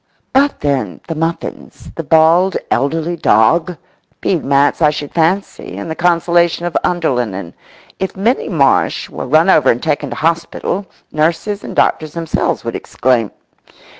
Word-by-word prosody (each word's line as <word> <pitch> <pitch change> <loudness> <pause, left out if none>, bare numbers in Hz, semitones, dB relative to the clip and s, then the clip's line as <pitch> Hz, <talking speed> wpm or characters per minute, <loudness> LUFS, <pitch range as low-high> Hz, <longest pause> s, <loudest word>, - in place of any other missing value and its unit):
But 280 +2 +2
then—the 135 - -2
muffins, 165 +1 -5
the - - -4
bald 165 +4 +4
elderly 165 +4 0
dog? 165 +5 +2 0.4
Bead 175 -5 0
mats 140 +3 +2
I 150 - +6
should 145 -1 -5
fancy 175 +4 -1
and 160 - -5
the - - -3
consolation 170 0 +2
of 175 - -4
underlinen. 125 - -1 0.5
If 190 0 -3
Minnie 230 +7 0
Marsh 150 -7 +1
were - - -6
run 155 +6 +4
over 150 -8 +4
and 120 - +1
taken 150 -2 -1
to - - -5
hospital, 170 +4 -2 0.2
nurses 170 +7 -1
and - - -7
doctors 155 -2 +1
themselves 165 -2 -2
would - - -3
exclaim. 120 -4 0
165 Hz, 140 wpm, -16 LUFS, 145-175 Hz, 0.5 s, I